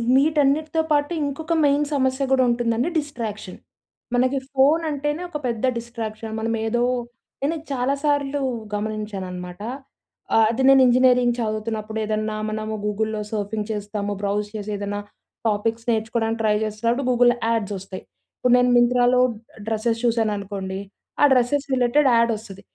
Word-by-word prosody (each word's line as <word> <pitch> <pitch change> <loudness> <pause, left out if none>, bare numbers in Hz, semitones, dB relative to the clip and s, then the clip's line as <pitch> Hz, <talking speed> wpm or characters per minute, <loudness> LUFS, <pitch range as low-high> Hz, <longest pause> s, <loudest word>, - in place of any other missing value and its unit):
వీటన్నిటితో 300 +2 +2
పాటు 290 +1 +2
ఇంకొక 310 +4 -2
మెయిన్ 290 +1 +3
సమస్య 265 0 +1
గూడా 260 -1 +4
ఉంటుందండి 235 +3 +1
డిస్ట్రాక్షన్. 225 -9 -6 0.6
మనకి 255 +2 +2 0.2
ఫోన్ 285 +5 +4
అంటేనే 295 +2 -2
ఒక 300 - -4
పెద్ద 235 0 -1
డిస్ట్రాక్షన్. 225 -2 -6
మనం 225 +1 -1
ఏదో 240 +2 0 0.6
నేనిది 315 +2 -1
చాలా 260 +1 0
సార్లు 285 -1 +1 0.3
గమనించానన్నమాట. 200 -4 -4 0.7
ఆ! - - +6
అది 235 +3 -1
నేను 270 -1 +7
ఇంజనీరింగ్ 250 -1 +4
చదువుతున్నప్పుడు 220 0 -3
ఏదన్నా 215 0 -2
మనము 215 0 -3
గూగుల్‌లో 215 +1 -1
సర్ఫింగ్ 210 0 -3
చేస్తాము. 205 -1 -3
బ్రౌజ్ 205 +1 -1
చేసి 210 0 -4
ఏదన్నా 205 0 -3 0.5
టాపిక్స్ 225 +2 -1
నేర్చుకోవడానికి 225 0 -1
ట్రై 210 -1 +3
జేస్తున్నప్పుడు, 230 +5 -1
గూగుల్‍లో 245 0 +4
యాడ్స్ 220 -3 0
వస్తాయి. 190 0 -9 0.3
ఇప్పుడు 250 - +2
నేను 250 0 +3
మింత్రలో 245 +1 +4 0.5
డ్రెస్సెస్ 225 +1 0
చూశాననుకోండి. 200 -4 -1 0.4
ఆ - - +6
డ్రెస్సెస్ 260 +3 +2
రిలేటెడ్ 260 +3 +3
యాడ్ 230 0 +3
వస్తది. 200 -3 -11
230 Hz, 130 wpm, -23 LUFS, 215-265 Hz, 0.7 s, నేను